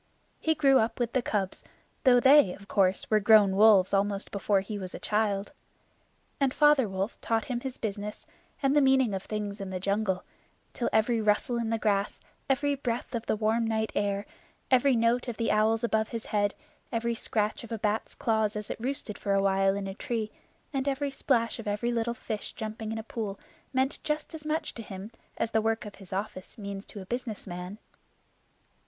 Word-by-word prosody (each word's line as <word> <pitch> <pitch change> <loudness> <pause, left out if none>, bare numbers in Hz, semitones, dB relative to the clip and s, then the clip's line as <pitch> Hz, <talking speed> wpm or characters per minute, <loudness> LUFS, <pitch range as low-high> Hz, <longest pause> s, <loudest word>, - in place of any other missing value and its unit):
He 320 0 +1
grew 275 -3 +5
up 225 +2 0
with 240 -1 -1
the 255 - +2
cubs, 200 -5 -2 0.4
though 245 -1 +7
they, 265 -7 +6
of 200 - -15
course, 190 -2 +2
were 215 - +5
grown 210 -2 +6
wolves 205 -3 +6
almost 200 0 0
before 200 -1 +1
he 205 +1 -5
was 185 -2 -6
a - - -6
child. 210 0 0 0.9
And 275 -2 +3
Father 295 -6 +5
Wolf 195 +3 -3
taught 225 -1 0
him 245 -2 -2
his 260 0 -6
business, 210 -1 -5 0.4
and 275 +1 +3
the 295 - +6
meaning 265 -5 +4
of 190 - -2
things 205 -1 -4
in 195 - -5
the 185 -1 -3
jungle, 195 0 0 0.5
till 240 - -1
every 225 +1 +2
rustle 215 +3 +1
in 230 -1 -1
the 225 - +1
grass, 205 -2 0 0.3
every 285 +2 +2
breath 245 -4 -3
of 235 -1 -3
the - - +2
warm 225 +2 +1
night 220 -1 0
air, 200 0 0 0.5
every 260 +1 +5
note 230 +2 +2
of 240 - -4
the 230 - +1
owls 220 +2 +2
above 220 -1 +1
his 230 -1 -5
head, 205 -1 0 0.4
every 235 0 0
scratch 215 -1 -1
of 235 - -10
a 225 - -1
bat's 215 +1 -1
claws 220 -2 +1
as 210 0 -4
it - - -5
roosted 250 -4 -3
for 200 -1 0
a 195 - +2
while 195 0 +3
in 200 -1 -3
a 195 - -4
tree, 225 -1 -3 0.4
and 270 0 -1
every 280 0 0
splash 235 -4 0
of 225 - -7
every 210 +4 0
little 235 0 -1
fish 220 -4 -5
jumping 220 -1 -5
in 225 - -3
a 220 - -4
pool 215 -3 -5 0.3
meant 265 +1 0
just 300 +1 -2
as 310 -1 -8
much 310 0 -1
to 230 - -7
him 200 0 -8 0.3
as 225 0 -1
the 220 0 +2
work 225 0 0
of 205 - -8
his 190 - -12
office 190 -1 -5
means 200 -2 -6
to 205 - -8
a - - -9
business 240 0 -4
man. 180 +1 -6
220 Hz, 205 wpm, -29 LUFS, 200-240 Hz, 0.9 s, though